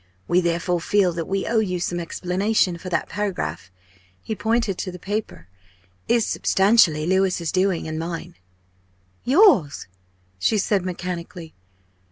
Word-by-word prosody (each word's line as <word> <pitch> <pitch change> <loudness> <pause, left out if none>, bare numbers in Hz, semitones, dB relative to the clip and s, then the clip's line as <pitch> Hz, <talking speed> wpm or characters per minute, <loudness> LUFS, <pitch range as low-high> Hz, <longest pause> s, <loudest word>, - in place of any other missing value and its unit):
We 180 +1 +3
therefore 170 0 -1
feel 190 0 +2
that 165 -1 -4
we 195 0 -1
owe 230 -1 +1
you 185 -4 -1
some 175 0 -2
explanation. 180 +2 0
For 185 - -7
that 170 -2 -1
paragraph" 205 - -4 0.5
he 220 - -3
pointed 220 -1 0
to 185 - -3
the 180 - -9
paper 200 - -5 0.6
"is, 235 -2 +2
substantially 190 -6 +3
Louis's 185 -2 +1
doing, 185 -3 0
and 155 0 -4
mine." 170 +1 -5 0.9
"Yours?" 255 - +4 0.5
she 215 - +2
said 200 -1 +1
mechanically. 175 -1 -6
185 Hz, 135 wpm, -22 LUFS, 170-205 Hz, 0.9 s, Yours